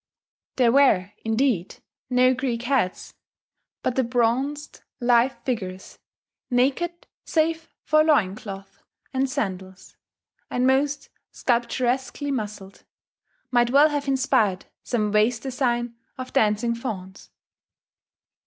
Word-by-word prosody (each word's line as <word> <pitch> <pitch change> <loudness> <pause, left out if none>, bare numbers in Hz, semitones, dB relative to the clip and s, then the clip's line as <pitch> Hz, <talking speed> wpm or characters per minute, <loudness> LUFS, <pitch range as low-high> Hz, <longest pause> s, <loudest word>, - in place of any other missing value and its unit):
There 245 -3 +4
were, 230 -9 +4
indeed, 225 -4 0 0.3
no 255 0 +4
Greek 245 -2 -2
heads; 245 -8 -1 0.7
but 250 - 0
the 260 - +2
bronzed 250 +5 -1 0.2
lithe 245 +1 +3
figures, 190 -7 -4 0.5
naked 280 +8 0 0.2
save 325 0 0
for 310 0 +4
loin 285 -12 +3
cloth 195 -2 -10 0.3
and 265 0 0
sandals, 190 -5 -5 0.5
and 250 0 0
most 280 +2 +1 0.2
sculpturesquely 255 +3 -1
muscled, 210 -5 -5 0.7
might 240 -1 +3
well 285 +4 +6
have 290 -1 -3
inspired 260 -8 +1 0.2
some 215 -4 -1
vase 215 +3 +3
design 240 -2 -1 0.2
of 255 0 -7
dancing 215 +2 +2
fauns. 200 -6 -7
245 Hz, 105 wpm, -24 LUFS, 215-270 Hz, 0.7 s, well